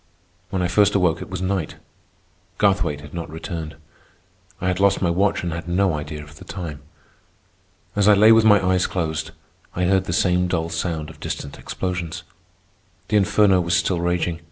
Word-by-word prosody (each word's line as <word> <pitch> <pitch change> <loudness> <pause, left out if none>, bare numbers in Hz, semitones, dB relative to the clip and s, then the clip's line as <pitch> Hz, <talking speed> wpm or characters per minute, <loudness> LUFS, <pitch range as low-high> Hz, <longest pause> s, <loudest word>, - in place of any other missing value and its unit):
When 95 -2 -1
I - - +2
first 100 +2 +3
awoke, 90 -4 +2
it - - -8
was 95 0 -4
night. 95 -6 -2 0.8
Garthwaite 90 -8 +1
had 75 -1 -12
not 85 -2 -5
returned. 80 0 -6 0.8
I 90 - -2
had 90 0 0
lost 100 0 +3
my 85 -3 +1
watch 95 +3 +1
and 85 -2 -2
had 85 0 -6
no 90 +1 +2
idea 75 0 -5
of 75 0 -15
the - - -11
time. 85 -7 -7 1.1
As 105 0 +2
I 105 - +7
lay 110 +3 +7
with 115 0 +6
my 105 -2 +6
eyes 95 0 +2
closed, 80 -3 -2 0.5
I 90 - -1
heard 95 +1 +2
the - - -3
same 90 +1 +2
dull 85 -2 -1
sound 80 -2 -3
of - - -17
distant 70 - -6
explosions. 90 -2 -4 0.9
The 105 - +3
inferno 100 -1 +4
was 85 +1 0
still 90 0 +1
raging. 85 -1 -1
90 Hz, 180 wpm, -22 LUFS, 80-95 Hz, 1.1 s, I